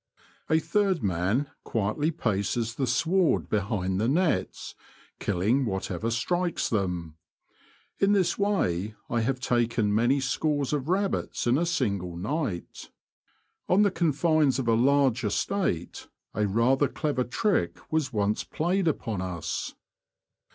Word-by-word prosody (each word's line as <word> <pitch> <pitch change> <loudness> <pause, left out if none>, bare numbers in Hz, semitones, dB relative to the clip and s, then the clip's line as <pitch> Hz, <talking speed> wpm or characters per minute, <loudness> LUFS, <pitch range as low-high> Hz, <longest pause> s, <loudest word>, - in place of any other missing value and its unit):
A 160 - +4
third 185 - +1
man 100 - 0
quietly 115 +8 -1
paces 115 -3 -1
the 135 0 -2
sward 165 +8 +2
behind 100 -2 -1
the 110 - +1
nets, 165 +5 0 0.5
killing 105 +8 +1
whatever 95 -1 -2
strikes 175 +9 0
them. 90 -7 -2 0.8
In 200 +1 +4
this 190 -4 +2
way 110 - 0 0.2
I 120 0 +1
have 130 +3 -1
taken 120 -4 +1
many 120 +6 +3
scores 145 +2 0
of 145 +1 -2
rabbits 195 +2 -1
in 120 +1 +3
a 170 +4 +1
single 100 - -1
night. 105 - -4 0.8
On 195 +3 +5
the 200 - +3
confines 155 -4 +2
of 130 -3 -2
a 115 - +4
large 130 +1 +3
estate 110 - -2 0.3
a 105 -1 0
rather 125 +7 +3
clever 145 -4 -1
trick 205 - 0
was 155 -3 0
once 105 -1 0
played 175 +3 -1
upon 115 - -1
us. 90 -3 -4
125 Hz, 130 wpm, -27 LUFS, 105-160 Hz, 0.8 s, On